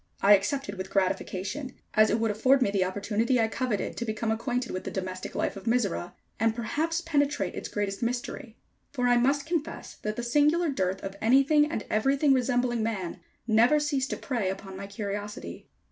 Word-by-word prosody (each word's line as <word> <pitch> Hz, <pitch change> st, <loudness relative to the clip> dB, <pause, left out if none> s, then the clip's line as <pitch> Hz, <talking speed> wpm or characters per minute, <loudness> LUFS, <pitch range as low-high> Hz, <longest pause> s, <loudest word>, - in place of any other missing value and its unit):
I 200 Hz, +1 st, +8 dB
accepted 205 Hz, 0 st, -2 dB
with 190 Hz, -, -4 dB
gratification, 195 Hz, +6 st, -2 dB, 0.2 s
as 215 Hz, 0 st, +5 dB
it 220 Hz, -, +1 dB
would 225 Hz, -1 st, +1 dB
afford 260 Hz, +6 st, +4 dB
me 200 Hz, -, 0 dB
the 195 Hz, -2 st, +2 dB
opportunity 205 Hz, +6 st, 0 dB
I 225 Hz, -, +3 dB
coveted 225 Hz, -2 st, -2 dB
to -, -, -2 dB
become 220 Hz, 0 st, -2 dB
acquainted 245 Hz, +2 st, -2 dB
with 185 Hz, -, -4 dB
the -, -, -4 dB
domestic 185 Hz, -1 st, -5 dB
life -, -, -1 dB
of 195 Hz, -, -9 dB
Mizora, 220 Hz, -7 st, 0 dB, 0.3 s
and 225 Hz, 0 st, +2 dB
perhaps 315 Hz, +9 st, -1 dB
penetrate 290 Hz, -3 st, 0 dB
its -, -, -5 dB
greatest 200 Hz, -1 st, -2 dB
mystery, 240 Hz, 0 st, -3 dB, 0.3 s
for 250 Hz, -3 st, 0 dB
I 245 Hz, 0 st, +5 dB
must 275 Hz, +3 st, +2 dB
confess 325 Hz, -2 st, -3 dB
that 215 Hz, 0 st, -2 dB
the 240 Hz, -, -4 dB
singular 300 Hz, +7 st, +3 dB
dearth 190 Hz, -7 st, -1 dB
of 195 Hz, 0 st, -5 dB
anything 275 Hz, +6 st, +4 dB
and 220 Hz, -, -3 dB
everything 270 Hz, +6 st, +3 dB
resembling 245 Hz, -2 st, +1 dB
Man, 195 Hz, -5 st, -3 dB, 0.3 s
never 235 Hz, +6 st, +4 dB
ceased 285 Hz, -3 st, 0 dB
to -, -, -2 dB
prey 235 Hz, -8 st, -2 dB
upon 195 Hz, 0 st, -6 dB
my 195 Hz, +1 st, -6 dB
curiosity. 205 Hz, +1 st, -6 dB
230 Hz, 185 wpm, -28 LUFS, 200-270 Hz, 0.3 s, I